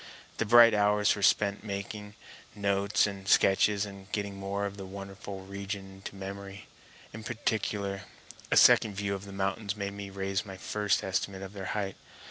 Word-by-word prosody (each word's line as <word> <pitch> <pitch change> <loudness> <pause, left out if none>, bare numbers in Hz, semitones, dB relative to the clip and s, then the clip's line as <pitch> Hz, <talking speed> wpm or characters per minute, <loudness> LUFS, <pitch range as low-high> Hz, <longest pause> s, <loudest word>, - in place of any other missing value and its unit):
The 115 - 0
bright 120 0 +8
hours 105 0 +3
were 100 - -6
spent 100 0 +3
in 110 - -11
making 105 +1 -5 0.4
notes 100 +1 +2
and 100 -2 -6
sketches 100 +1 +4
and 100 -1 -11
getting 100 -1 -2
more 100 +1 -3
of 100 0 -4
the 95 - -7
wonderful 100 0 -8
region 100 0 -6
into 95 +1 -9
memory. 100 0 -7 0.5
In 110 +1 -8
particular 105 -4 -2 0.5
a - - +3
second 105 -3 +6
view 100 0 -1
of 100 0 -5
the 100 - -9
mountains 100 +1 -2
made 100 -1 -3
me 100 -1 -7
raise 95 0 -2
my 95 -3 -9
first 105 +1 0
estimate 95 0 -2
of 95 +1 -8
their 95 -2 -6
height. 100 -2 -3
100 Hz, 175 wpm, -30 LUFS, 95-105 Hz, 0.5 s, bright